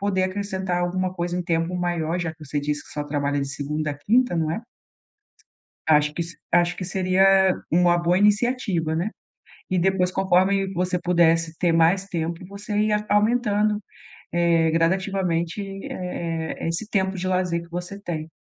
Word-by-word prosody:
poder 195 -2 +1
acrescentar 190 -2 -2
alguma 185 +1 -1
coisa, 175 0 -2
um 180 - -1
tempo 170 0 -1
maior, 175 -1 -1
já 165 -2 -2
que 160 -1 -16
você 145 +1 -3
disse 150 0 -2
que - - -16
só 150 -1 -3
trabalha 145 -1 -1
de 140 - -3
segunda 150 +2 -3
à - - -4
quinta, 235 +5 +2
não 160 -1 0
é? 170 - -2 1.3
Acho 150 -1 +4
que 170 - -1
se 170 0 -9 0.2
acho 175 0 +3
que 185 - -4
seria 185 +1 +2 0.5
uma 175 +1 +4
boa 175 +2 +2
iniciativa, 205 -6 +1
né? 185 +6 -1 0.6
E 185 - +1
depois 185 0 +2
conforme 190 +1 +2
você 180 +1 0
pudesse 165 -2 +2
ter 175 -2 +2
mais 165 +4 +3
tempo, 170 -1 -3
você 205 +2 -6
ia 210 0 +1
aumentando, 210 -1 +2 0.5
eh, 170 -1 +3
gradativamente, 175 +1 0
eh 195 0 -7
eh 165 -3 -4
eh, - - -1
esse 175 +6 -3
tempo 190 -1 0
de 185 +1 -3
lazer 180 -2 0
que 170 - -16
você 180 +3 -6
tem. 160 -4 -5
175 Hz, 175 wpm, -24 LUFS, 165-195 Hz, 1.3 s, Acho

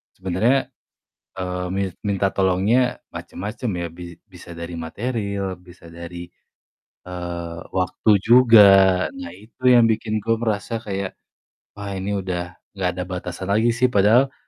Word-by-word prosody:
Sebenernya, 95 +9 +1 0.7
eee, 90 0 -3
mis 95 -1 -1
minta 100 -1 0
tolongnya 100 +7 +2 0.2
macem-macem 105 +4 -5
ya, 85 - -2
bi 85 -1 -10
bisa 90 -3 -14
dari 85 +1 -6
materil, 100 +2 -3
bisa 90 -1 -15
dari, 85 +1 -9 0.8
eee, 85 -2 -6 0.2
waktu 90 +4 -1
juga. 115 -1 +7 0.6
Nah, 275 0 -7
itu 110 +4 -18
yang 120 -1 +6
bikin 110 0 -1
gue 115 +1 +1
merasa 110 -1 -2
kayak, 100 -1 -4 0.6
"Wah, 100 -1 -7
ini 95 +2 -4
udah 90 -2 -3 0.4
nggak 95 -2 0
ada 90 - -4
batasan 90 +1 -6
lagi 110 +4 +2
sih," 125 +2 +2
padahal 120 +6 +3
100 Hz, 135 wpm, -22 LUFS, 90-115 Hz, 0.8 s, juga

